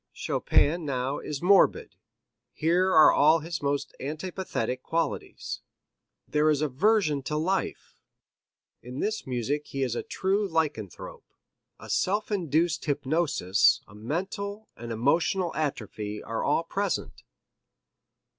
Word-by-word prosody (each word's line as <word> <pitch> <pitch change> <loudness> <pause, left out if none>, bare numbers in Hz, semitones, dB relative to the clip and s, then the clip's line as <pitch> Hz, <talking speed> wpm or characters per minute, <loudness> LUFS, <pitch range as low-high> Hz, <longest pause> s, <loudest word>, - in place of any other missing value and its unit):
Chopin 165 +4 +1
now 135 -1 -2
is 150 +1 -5
morbid, 195 +2 +4 0.6
here 175 +4 +2
are 155 -3 +8
all 155 +2 +5
his 165 +1 -5
most 140 0 -2
antipathetic 150 -5 -3
qualities. 165 +3 -3 0.7
There 150 +1 +2
is 150 -1 +2
aversion 155 - +2
to 150 +3 -3
life 185 +5 -2 0.8
in 125 +3 -8
this 215 -5 -2
music 130 +4 -2
he 135 -1 -2
is 125 -3 -1
a - - -2
true 195 +2 -1
lycanthrope. 150 - -3 0.5
A - - -11
self 205 +4 0
induced 165 -3 0
hypnosis, 145 - +2
a 100 - -16
mental, 195 - -4
an 120 +1 -7
emotional 165 - +1
atrophy 105 -8 -3
are 115 0 -3
all 150 +3 +2
present. 200 +4 -3
155 Hz, 115 wpm, -27 LUFS, 135-180 Hz, 0.8 s, are